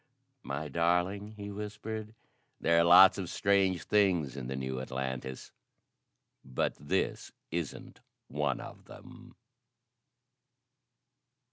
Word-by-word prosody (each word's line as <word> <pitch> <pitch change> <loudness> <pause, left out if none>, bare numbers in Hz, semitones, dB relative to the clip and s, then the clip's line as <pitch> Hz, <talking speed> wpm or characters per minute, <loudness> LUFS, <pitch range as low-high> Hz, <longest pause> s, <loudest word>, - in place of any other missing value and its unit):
"My 70 +4 -4
darling," 90 +7 0
he 100 0 -6
whispered, 105 +1 -6 0.4
"there 85 0 +3
are - - +5
lots 95 +3 +8
of 90 -3 -4
strange 95 -3 +2
things 90 -10 +2
in 65 -3 -5
the 65 - -4
new 65 -1 -3
Atlantis 65 0 -5 0.9
but 65 -1 -1
this 70 - -2 0.2
isn't 85 -2 -5 0.3
one 75 0 -1
of - - -10
them." - - -14
85 Hz, 105 wpm, -31 LUFS, 65-100 Hz, 0.9 s, lots